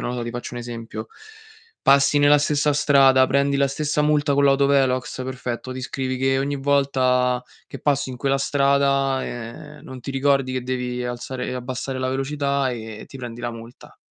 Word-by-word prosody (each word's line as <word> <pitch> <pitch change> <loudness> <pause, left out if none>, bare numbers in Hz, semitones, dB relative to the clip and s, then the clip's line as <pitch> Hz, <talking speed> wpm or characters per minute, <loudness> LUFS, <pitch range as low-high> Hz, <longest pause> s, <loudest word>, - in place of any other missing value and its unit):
nodo 120 -1 -3
ti 120 - -4
faccio 120 0 -6
un 120 - -4
esempio: 115 -2 -7 0.8
passi 140 +1 +4
nella 145 0 +6
stessa 150 0 +1
strada, 135 -3 +5
prendi 140 +1 +2
la 140 0 +2
stessa 150 +2 -1
multa 150 -1 +2
con 140 - +3
l'autovelox, 135 -2 +2
perfetto, 125 -1 -5
ti 130 - -6
scrivi 130 0 -3
che 135 0 +2
ogni 140 +1 -1
volta 130 -3 +1 0.3
che - - -8
passi 140 -2 0
in 125 - -7
quella 135 +2 0
strada, 140 -1 +2
ehm, 120 +6 -8
non 130 -1 -9
ti 135 - -6
ricordi 135 -1 +1
che 130 -1 -2
devi 125 -1 -3
alzare 125 +1 -5
e 125 - -4
abbassare 130 +1 -4
la 130 - -1
velocità 140 0 -1
e 110 -2 -7
ti - - -11
prendi 120 -2 -7
la 120 0 -3
multa. 115 +1 -13
135 Hz, 180 wpm, -22 LUFS, 125-140 Hz, 0.8 s, nella